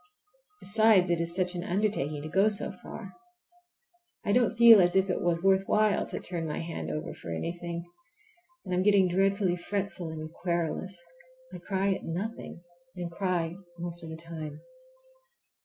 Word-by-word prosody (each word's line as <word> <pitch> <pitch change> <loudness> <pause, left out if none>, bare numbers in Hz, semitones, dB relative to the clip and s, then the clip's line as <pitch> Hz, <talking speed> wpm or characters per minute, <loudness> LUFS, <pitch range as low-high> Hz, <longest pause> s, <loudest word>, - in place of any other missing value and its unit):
Besides, 205 -3 +4
it 170 -1 +1
is 170 +1 -2
such 180 -1 0
an 175 -1 -4
undertaking 175 -7 -1
to - - -5
go 195 +6 +3
so 205 - -1
far. - - -9 1.1
I - - +1
don't 240 +1 +3
feel 230 -3 +9
as 175 +1 +3
if 190 0 +3
it - - -2
was 170 0 0
worth 195 0 +4
while 215 -1 +2
to - - -4
turn 170 -3 -4
my 150 - -3
hand 165 - -4
over 75 0 -4
for - - -10
anything, 170 - -4 0.8
and 185 - -3
I'm 180 - +2
getting 195 -1 +5
dreadfully 195 0 +2
fretful 185 -1 -4
and 155 0 -7
querulous. 175 +2 -2 0.5
I - - -7
cry 195 0 0
at - - -6
nothing, 180 0 -5 0.3
and 175 -2 -5
cry 175 -2 -1 0.2
most 175 0 -5
of 165 - -7
the 160 - -7
time. 160 -2 -8
180 Hz, 165 wpm, -29 LUFS, 170-195 Hz, 1.1 s, feel